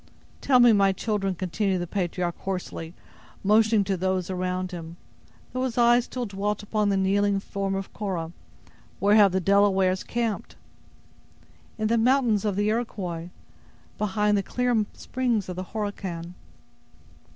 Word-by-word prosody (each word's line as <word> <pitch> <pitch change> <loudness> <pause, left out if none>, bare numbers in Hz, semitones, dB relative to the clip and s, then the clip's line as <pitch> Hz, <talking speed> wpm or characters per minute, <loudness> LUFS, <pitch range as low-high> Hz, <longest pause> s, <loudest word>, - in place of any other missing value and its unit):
"Tell 260 -3 +4
me, 240 -2 +7
my 195 -2 +4
children," 195 -2 -1
continued 185 +2 -1
the 175 - -2
patriarch, 175 -1 -2
hoarsely, 180 -3 -5 0.5
motioning 215 +1 +4
to 195 0 -1
those 185 0 -1
around 185 0 -2
him, 170 -1 -8 0.6
though 255 - -2
his 250 -3 -3
eyes 240 0 +5
still 250 -1 -4
dwelt 205 0 -3
upon 210 0 0
the 195 - +2
kneeling 200 +1 +2
form 195 0 -3
of 195 0 -5
Cora, 180 -6 -3 0.7
"where 205 +1 +3
have 205 -3 +6
the 190 - +1
Delawares 195 -1 +3
camped?" 230 -3 -3 1.2
"In 215 -1 0
the 230 +1 +2
mountains 235 -4 +3
of 205 -2 0
the 205 +1 +1
Iroquois, 185 -7 -3 0.7
beyond 210 0 +1
the - - 0
clear 240 0 0
springs 240 -6 -1
of 180 - -4
the 185 +1 -5
Horican." 190 -5 -5
200 Hz, 145 wpm, -26 LUFS, 185-215 Hz, 1.2 s, me